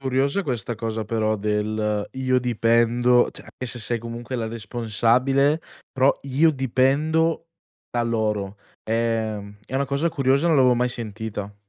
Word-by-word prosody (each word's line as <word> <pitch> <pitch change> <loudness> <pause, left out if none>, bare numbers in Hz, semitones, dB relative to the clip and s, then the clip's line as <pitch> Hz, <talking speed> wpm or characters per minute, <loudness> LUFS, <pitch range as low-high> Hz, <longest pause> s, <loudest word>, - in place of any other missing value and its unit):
curiosa 135 +7 0
questa 120 - -3
cosa 110 0 -3
però 110 0 0
del 105 0 -1
"io 130 -1 +1
dipendo" 120 +1 +3
cioè - - -12
anche 130 - -8
se 120 0 -5
sei 120 +1 -2
comunque 120 +2 -7
la 115 -2 -2
responsabile, 120 +6 +1 0.3
però 135 +1 +3
"io 140 +4 +3
dipendo 150 +5 +1 0.4
da 120 - 0
loro." 105 -4 -1 0.3
Ehm, 110 -3 -2
è 130 - -8
una 140 +1 +1
cosa 140 +4 0
curiosa, 140 -1 +1
non 160 -3 +4
l'avevo 125 -2 +5
mai 125 +1 +1
sentita. 110 -3 -5
120 Hz, 145 wpm, -23 LUFS, 110-135 Hz, 0.4 s, l'avevo